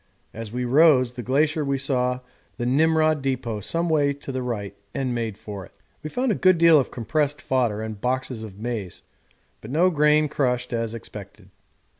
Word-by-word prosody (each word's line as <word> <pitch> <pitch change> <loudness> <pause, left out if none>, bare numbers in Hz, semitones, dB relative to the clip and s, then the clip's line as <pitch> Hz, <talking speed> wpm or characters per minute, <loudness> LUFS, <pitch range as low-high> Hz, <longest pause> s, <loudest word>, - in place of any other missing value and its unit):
As 115 -1 -7
we 125 +1 -2
rose 130 -2 +5
the 125 - -6
glacier 150 +5 +1
we 140 -1 0
saw 125 -2 0 0.4
the 120 - -2
Nimrod 155 +3 +3
depot 130 -5 -2
some 165 - -1
way 145 -3 +2
to 140 0 -8
the 130 -1 -3
right 105 -5 -4 0.2
and 135 -3 -1
made 115 -4 -3
for 100 -2 -8
it. - - -16 0.3
We 155 - -5
found 250 +7 0
a - - -2
good 185 -2 +5
deal 165 -2 +6
of 135 - -1
compressed 145 +4 -1
fodder 120 -5 0
and 110 -2 -6
boxes 125 -1 -2
of 105 -3 -9
maize, 110 -5 -5 0.6
but 110 - -10
no 170 +7 +3
grain 150 -1 +3
crushed 125 -4 -1
as 115 -1 -2
expected. 105 -3 -11
130 Hz, 185 wpm, -24 LUFS, 115-150 Hz, 0.6 s, deal